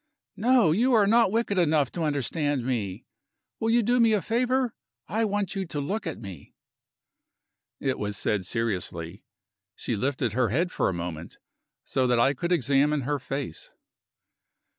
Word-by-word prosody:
"No! 240 Hz, -8 st, +4 dB
You 240 Hz, +10 st, +2 dB
are 210 Hz, -2 st, +5 dB
not 225 Hz, -1 st, +4 dB
wicked 220 Hz, -3 st, 0 dB
enough 155 Hz, -5 st, +2 dB
to 170 Hz, -, -5 dB
understand 145 Hz, -2 st, -1 dB
me. 105 Hz, -8 st, -3 dB, 0.5 s
Will 225 Hz, -, 0 dB
you 235 Hz, +1 st, +4 dB
do 245 Hz, +3 st, +2 dB
me 230 Hz, -2 st, +5 dB
a 210 Hz, -, +2 dB
favor? 250 Hz, +1 st, +1 dB, 0.3 s
I 220 Hz, +4 st, 0 dB
want 205 Hz, -2 st, -1 dB
you 195 Hz, -, -1 dB
to 150 Hz, -, -4 dB
look 195 Hz, +8 st, -3 dB
at 160 Hz, -, -4 dB
me." 95 Hz, -9 st, -10 dB, 1.2 s
It 135 Hz, -2 st, -1 dB
was 105 Hz, -1 st, -3 dB
said 100 Hz, -1 st, 0 dB
seriously. 95 Hz, -5 st, -3 dB, 0.5 s
She 120 Hz, -, -3 dB
lifted 130 Hz, 0 st, -1 dB
her 125 Hz, -1 st, +1 dB
head 170 Hz, -, 0 dB
for -, -, 0 dB
a -, -, 0 dB
moment, 85 Hz, -1 st, -6 dB, 0.5 s
so 130 Hz, -1 st, 0 dB
that 125 Hz, -1 st, +2 dB
I 135 Hz, +4 st, +4 dB
could 170 Hz, +6 st, -3 dB
examine 145 Hz, -1 st, +2 dB
her 145 Hz, +3 st, -1 dB
face. 135 Hz, +1 st, -5 dB
145 Hz, 160 wpm, -26 LUFS, -, 1.2 s, are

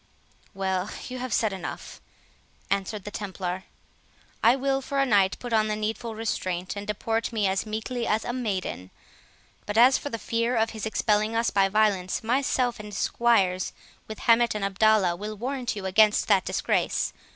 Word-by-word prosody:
"Well, 190 Hz, 0 st, -1 dB, 0.2 s
you 255 Hz, 0 st, -5 dB
have 255 Hz, -1 st, -4 dB
said 210 Hz, 0 st, +1 dB
enough," 185 Hz, -2 st, -7 dB, 0.7 s
answered 200 Hz, +1 st, -1 dB
the 210 Hz, -, -7 dB
Templar; 190 Hz, -2 st, -4 dB, 0.8 s
"I 235 Hz, +3 st, +6 dB
will 270 Hz, 0 st, 0 dB
for 275 Hz, +1 st, -4 dB
a 275 Hz, -, +4 dB
night 200 Hz, -6 st, +3 dB
put 245 Hz, -2 st, -6 dB
on 215 Hz, -1 st, +3 dB
the 215 Hz, -, -1 dB
needful 220 Hz, +2 st, -3 dB
restraint, 185 Hz, -5 st, -3 dB
and 200 Hz, 0 st, -6 dB
deport 225 Hz, +2 st, -1 dB
me 215 Hz, -3 st, 0 dB
as 190 Hz, +2 st, 0 dB
meekly 225 Hz, +3 st, -3 dB
as 215 Hz, +1 st, 0 dB
a 240 Hz, -, -2 dB
maiden; 195 Hz, -, -3 dB, 0.8 s
but 210 Hz, +1 st, -2 dB
as 250 Hz, +3 st, +6 dB
for 285 Hz, -, -5 dB
the 230 Hz, -, -4 dB
fear 230 Hz, +2 st, -1 dB
of 225 Hz, 0 st, +1 dB
his 220 Hz, -1 st, -4 dB
expelling 215 Hz, 0 st, +1 dB
us 230 Hz, +1 st, +1 dB
by 195 Hz, -1 st, +3 dB
violence, 200 Hz, -3 st, +1 dB
myself 250 Hz, 0 st, +1 dB
and 210 Hz, -1 st, -8 dB
squires, 195 Hz, -5 st, +1 dB, 0.3 s
with 220 Hz, -, -7 dB
Hamet 230 Hz, -1 st, +4 dB
and 205 Hz, -2 st, -1 dB
Abdalla, 200 Hz, -2 st, +3 dB
will 210 Hz, +3 st, -6 dB
warrant 250 Hz, +1 st, -3 dB
you 200 Hz, -2 st, -6 dB
against 210 Hz, +3 st, +4 dB
that 200 Hz, -3 st, +3 dB
disgrace. -, -, 0 dB
215 Hz, 175 wpm, -26 LUFS, 195-230 Hz, 0.8 s, I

